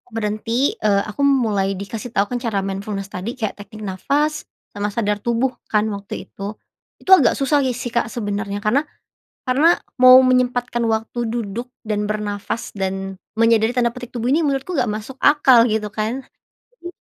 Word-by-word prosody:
berhenti, 225 Hz, +5 st, 0 dB
eee, 200 Hz, -2 st, +2 dB
aku 210 Hz, +6 st, -5 dB
mulai 225 Hz, -8 st, +2 dB
dikasih 215 Hz, +4 st, -6 dB
tahu 200 Hz, -, +2 dB
kan -, -, 0 dB
cara 215 Hz, -4 st, 0 dB
mindfulness 195 Hz, 0 st, -4 dB
tadi 185 Hz, +5 st, -4 dB
kayak 220 Hz, -5 st, -2 dB
teknik 210 Hz, +1 st, -11 dB
nafas 280 Hz, +11 st, 0 dB, 0.4 s
sama 205 Hz, -1 st, -2 dB
sadar 210 Hz, -2 st, 0 dB
tubuh 235 Hz, +3 st, 0 dB, 0.2 s
kan 210 Hz, 0 st, +2 dB
waktu 200 Hz, 0 st, -7 dB, 0.2 s
itu, -, -, -15 dB, 0.6 s
itu -, -, -11 dB
agak 280 Hz, -, +4 dB
susah 285 Hz, +1 st, +2 dB
si 260 Hz, -, +1 dB
sih 245 Hz, -1 st, -5 dB
Kak 235 Hz, -1 st, 0 dB
sebenernya 205 Hz, -2 st, -3 dB
karena 245 Hz, +7 st, +3 dB, 0.6 s
karena 290 Hz, +7 st, +4 dB, 0.2 s
mau 255 Hz, 0 st, +10 dB
menyempatkan 245 Hz, -1 st, +1 dB
waktu 225 Hz, +2 st, -2 dB
duduk, 230 Hz, +1 st, -4 dB, 0.2 s
dan 210 Hz, -1 st, -1 dB
bernafas, 210 Hz, +2 st, -3 dB
dan 195 Hz, -1 st, -4 dB, 0.2 s
menyadari 230 Hz, 0 st, +4 dB
tanda 235 Hz, -1 st, +2 dB
petik 245 Hz, -1 st, -8 dB
"tubuh 240 Hz, +2 st, -1 dB
ini" 320 Hz, -, +3 dB
menurutku 280 Hz, +3 st, -1 dB
nggak 255 Hz, -7 st, +1 dB
masuk 215 Hz, +5 st, -6 dB
akal 270 Hz, -5 st, +6 dB
gitu 215 Hz, 0 st, 0 dB
kan, 225 Hz, +5 st, -2 dB, 0.5 s
jadi 345 Hz, -, -9 dB
225 Hz, 165 wpm, -20 LUFS, 205-255 Hz, 0.6 s, mau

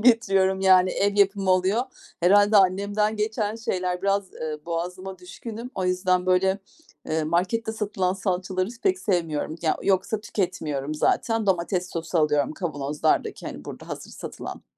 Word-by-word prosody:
getiriyorum 195 Hz, -5 st, +3 dB
yani 185 Hz, -1 st, +5 dB
ev 200 Hz, +2 st, 0 dB
yapımı 195 Hz, -1 st, +3 dB
oluyor. 185 Hz, +5 st, +3 dB, 0.4 s
Herhâlde 205 Hz, +4 st, +5 dB
annemden 200 Hz, +3 st, +2 dB
geçen 215 Hz, 0 st, -1 dB
şeyler 180 Hz, -5 st, -2 dB
biraz, 195 Hz, -1 st, 0 dB
eee, 155 Hz, -1 st, -4 dB
boğazıma 180 Hz, +3 st, -4 dB
düşkünüm. 225 Hz, +6 st, -8 dB
O 185 Hz, -, -2 dB
yüzden, 180 Hz, 0 st, +1 dB
böyle, 190 Hz, +1 st, +3 dB, 0.5 s
eee, 155 Hz, 0 st, 0 dB
markette 185 Hz, +8 st, 0 dB
satılan 200 Hz, -4 st, -1 dB
salçaları 185 Hz, 0 st, -1 dB
s 240 Hz, -1 st, -13 dB
pek 375 Hz, -1 st, +2 dB
sevmiyorum. 165 Hz, -, -1 dB
Ya 160 Hz, -, +2 dB
yoksa 195 Hz, +2 st, +1 dB
tüketmiyorum 155 Hz, -9 st, -2 dB
zaten. 225 Hz, +8 st, +1 dB
Domates 180 Hz, 0 st, 0 dB
sosu 165 Hz, +1 st, -2 dB
alıyorum 150 Hz, -2 st, +2 dB
kavanozlardaki, 150 Hz, -4 st, -1 dB
hani, -, -, -7 dB
burada -, -, -9 dB
hazır -, -, -7 dB
satılan. -, -, -8 dB
185 Hz, 140 wpm, -25 LUFS, 180-205 Hz, 0.5 s, yani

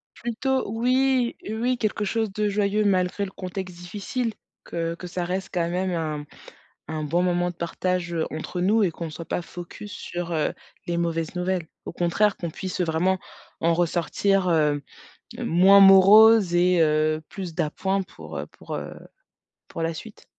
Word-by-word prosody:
Plutôt 240 Hz, 0 st, -2 dB
oui, 255 Hz, +2 st, +1 dB
heu, 220 Hz, +1 st, -4 dB
oui, 250 Hz, 0 st, +1 dB
quelque 210 Hz, -2 st, -1 dB
chose 220 Hz, +1 st, -1 dB
de 210 Hz, 0 st, 0 dB
joyeux 205 Hz, +1 st, +1 dB
malgré 185 Hz, 0 st, +1 dB
le 190 Hz, -, -7 dB
contexte 185 Hz, -1 st, -6 dB
difficile, 205 Hz, +7 st, -4 dB, 0.3 s
que 165 Hz, 0 st, -3 dB
que 180 Hz, +1 st, -9 dB
ça 175 Hz, 0 st, -3 dB
reste 185 Hz, +2 st, -3 dB
quand 170 Hz, -2 st, 0 dB
même 185 Hz, +2 st, -1 dB
un 155 Hz, -3 st, -3 dB, 0.6 s
un 155 Hz, -1 st, -3 dB
bon 170 Hz, +4 st, +1 dB
moment 175 Hz, 0 st, +1 dB
de -, -, -10 dB
partage, 175 Hz, 0 st, -2 dB
heu, 165 Hz, -1 st, -1 dB
entre 160 Hz, +3 st, -5 dB
nous 215 Hz, +5 st, +3 dB
et 190 Hz, -, +3 dB
qu'on 165 Hz, 0 st, -6 dB
soit 165 Hz, +2 st, -8 dB
pas -, -, -2 dB
focus 175 Hz, +4 st, -9 dB
su,r 175 Hz, 0 st, -5 dB
heu, 155 Hz, -2 st, 0 dB, 0.3 s
les 170 Hz, -, -1 dB
mauvaises 165 Hz, -1 st, -2 dB
nouvelles. 180 Hz, -2 st, -1 dB, 0.2 s
Au -, -, -6 dB
contraire, 180 Hz, +5 st, +1 dB
qu'on 170 Hz, -, -4 dB
puisse 185 Hz, +3 st, -5 dB
vraiment 180 Hz, +3 st, +1 dB, 0.4 s
en 170 Hz, -, +3 dB
ressortir, 180 Hz, +3 st, +1 dB
heu, 150 Hz, -3 st, +2 dB, 0.6 s
moins 190 Hz, +4 st, +5 dB
moroses 195 Hz, 0 st, +8 dB
et 180 Hz, 0 st, +4 dB
heu, 155 Hz, 0 st, +2 dB
plus 185 Hz, -5 st, -6 dB
d'appoint 190 Hz, +6 st, -1 dB
pour, 190 Hz, -, -9 dB
heu, -, -, -5 dB
pour, -, -, -8 dB
heu, -, -, -6 dB, 0.7 s
pour 165 Hz, -, -6 dB
la 165 Hz, 0 st, -1 dB
suite. 210 Hz, +6 st, -11 dB
180 Hz, 170 wpm, -24 LUFS, 170-205 Hz, 0.7 s, moroses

